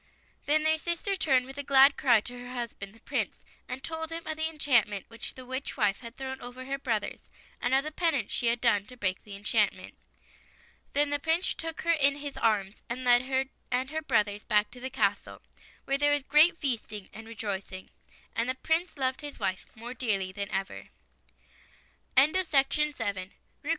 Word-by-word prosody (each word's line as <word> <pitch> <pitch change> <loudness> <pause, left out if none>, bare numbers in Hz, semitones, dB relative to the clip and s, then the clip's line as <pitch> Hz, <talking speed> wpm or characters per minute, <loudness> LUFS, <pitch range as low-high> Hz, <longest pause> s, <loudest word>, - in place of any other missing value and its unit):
Then 305 +1 +3
their 315 0 +2
sister 340 +4 -1
turned 265 -8 +3
with 270 +2 -9
a - - -3
glad 275 +1 +7
cry 240 -5 +4
to 245 +3 -7
her 245 0 -9
husband, 235 -5 -5
the 225 - -20
Prince, - - -1 0.3
and 255 +1 -5
told 320 +1 -4
him 330 0 -5
of 315 - -3
the 315 +1 -1
enchantment 240 - +2
which 230 0 -6
the 255 - -9
witch 260 +3 -4
wife 210 -5 +2
had 235 -1 -10
thrown 265 0 -5
over 245 +1 -8
her 275 +1 -3
brothers, 225 -6 -2 0.4
and 245 +2 +2
of 270 - +3
the 305 - -5
penance 310 - 0
she 240 - +1
had 235 +1 +2
done 210 -4 +2
to 250 - -12
break 185 -5 -1
the 205 -2 -9
enchantrnent. 200 +1 0 1.0
Then 290 0 +3
the 290 - +1
Prince 325 +4 +1
took 325 -1 -4
her 335 - +2
in 280 -3 +4
his 285 -1 -5
arms, 210 -3 0
and 250 +2 -3
led 245 -1 +6
her 265 0 +1 0.2
and 255 +2 0
her 315 0 -2
brothers 210 -7 +1
back 210 -2 +2
to 250 - -10
the 260 +1 -4
castle, 205 -5 -1 0.4
where 275 0 +1
there 290 0 +4
was 290 -1 +2
great 310 +5 +5
feasting 225 - -2
and 225 0 -10
rejoic 205 -4 -4
ing. 185 0 -8 0.4
And 230 +2 0
the 255 - 0
Prince 320 +4 -1
loved 260 +2 0
his 290 -1 -7
wife 185 0 -2
more 235 +2 -7
dearly 200 -7 -1
ever 200 -1 -4 1.3
after. 280 - +3
255 Hz, 190 wpm, -29 LUFS, 225-290 Hz, 1.3 s, glad